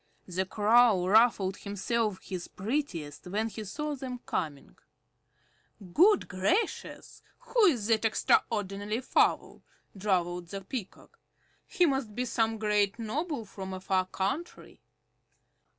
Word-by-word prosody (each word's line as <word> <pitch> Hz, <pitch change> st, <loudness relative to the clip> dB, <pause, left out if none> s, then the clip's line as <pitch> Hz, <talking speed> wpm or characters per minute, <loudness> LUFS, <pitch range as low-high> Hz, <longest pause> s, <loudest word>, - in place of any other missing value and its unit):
The 185 Hz, +1 st, -2 dB
Crow 215 Hz, -2 st, +4 dB
ruffled 205 Hz, -2 st, +4 dB
himself 205 Hz, 0 st, -2 dB
his 180 Hz, -3 st, -6 dB
prettiest 185 Hz, -, -4 dB
when 215 Hz, +5 st, -1 dB
he 220 Hz, 0 st, -7 dB
saw 300 Hz, +9 st, -4 dB
them 255 Hz, -2 st, -6 dB
coming. 150 Hz, -6 st, -4 dB, 1.2 s
"Good 405 Hz, +6 st, +5 dB
gracious! 200 Hz, -, -2 dB, 0.2 s
Who 470 Hz, -4 st, +3 dB
is 255 Hz, -, +2 dB
that 225 Hz, 0 st, +2 dB
extraordinary 210 Hz, -1 st, +1 dB
fowl?" -, -, +1 dB, 0.3 s
drawled 180 Hz, -3 st, -1 dB
the 195 Hz, +3 st, -6 dB
Peacock. 195 Hz, 0 st, -8 dB, 0.5 s
"He 360 Hz, -4 st, +3 dB
must 270 Hz, -8 st, -1 dB
be 250 Hz, -, -1 dB
some 225 Hz, -2 st, 0 dB
great 210 Hz, -1 st, +1 dB
noble 260 Hz, +3 st, -3 dB
from 190 Hz, -1 st, -7 dB
a -, -, -6 dB
far 185 Hz, 0 st, 0 dB
country." 200 Hz, -, -4 dB
210 Hz, 120 wpm, -29 LUFS, 190-245 Hz, 1.2 s, Good